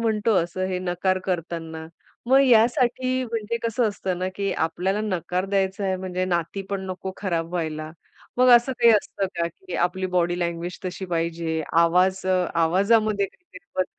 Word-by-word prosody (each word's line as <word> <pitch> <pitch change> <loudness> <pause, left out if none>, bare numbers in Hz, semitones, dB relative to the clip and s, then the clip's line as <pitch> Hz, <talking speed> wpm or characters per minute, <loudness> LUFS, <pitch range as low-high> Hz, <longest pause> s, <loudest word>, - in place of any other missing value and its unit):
म्हणतो 220 -1 +1
असं 175 +2 -4
हे 185 -1 -2
नकार 185 +1 0
करताना, 165 -3 -4 0.4
मग 265 +1 +6
यासाठी 250 +2 +3
म्हणजे 230 -1 -3
कसं 230 0 +1
असतं 190 -3 -3
ना, 185 +1 -1
की 200 -1 -1
आपल्याला 190 +5 -2
नकार 185 -2 -2
द्यायचा 195 +1 0
आहे, 190 -1 0
म्हणजे 185 0 -3
नाती 175 +2 -2
पण 200 -1 -1
नको 185 +1 -5
खराब 170 -4 -2
व्हायला. 155 -3 -3 0.5
मग 255 +1 +5
असं 240 +3 0
काही 235 -1 +6
असतं 200 -2 0
का 170 0 +1
की 370 - -11
आपली 185 +1 -4
बॉडी 175 0 +1
लँग्वेज 170 0 -3
तशी 185 +1 -4
पाहिजे, 165 -1 -1
आवाज, 180 +3 +3
अ, 185 -1 +2 0.2
आवाजामध्ये 200 +4 +2
काहीतरी 190 - -17
बदल 185 - +2
185 Hz, 165 wpm, -24 LUFS, 175-210 Hz, 0.5 s, मग